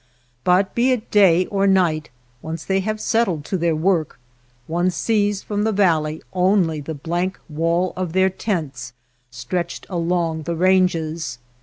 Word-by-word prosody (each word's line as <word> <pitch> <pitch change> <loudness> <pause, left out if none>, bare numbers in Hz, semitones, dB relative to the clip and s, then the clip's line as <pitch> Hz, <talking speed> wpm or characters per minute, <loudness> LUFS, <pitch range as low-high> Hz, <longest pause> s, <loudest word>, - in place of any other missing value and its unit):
But 185 +2 +2
be 240 +2 +2
it 245 -3 -2
day 185 -4 +5
or 195 0 0
night, 170 -5 +2 0.3
once 160 0 -6
they 195 0 +1
have 215 +3 -2
settled 195 -11 0
to - - -3
their 170 -2 +1
work, 165 -3 0 0.5
one 175 +4 0
sees 205 +2 0
from 205 0 -2
the 220 - +1
valley 160 -6 +1
only 180 -4 +2
the 155 +2 -6
blank 175 +6 -2
wall 170 +3 0
of 180 -3 -3
their 190 0 +3
tents 155 - -4 0.4
stretched 135 +9 -4
along 170 -2 -1
the 170 +2 -3
ranges. 170 -5 +1
180 Hz, 150 wpm, -21 LUFS, 160-190 Hz, 0.5 s, day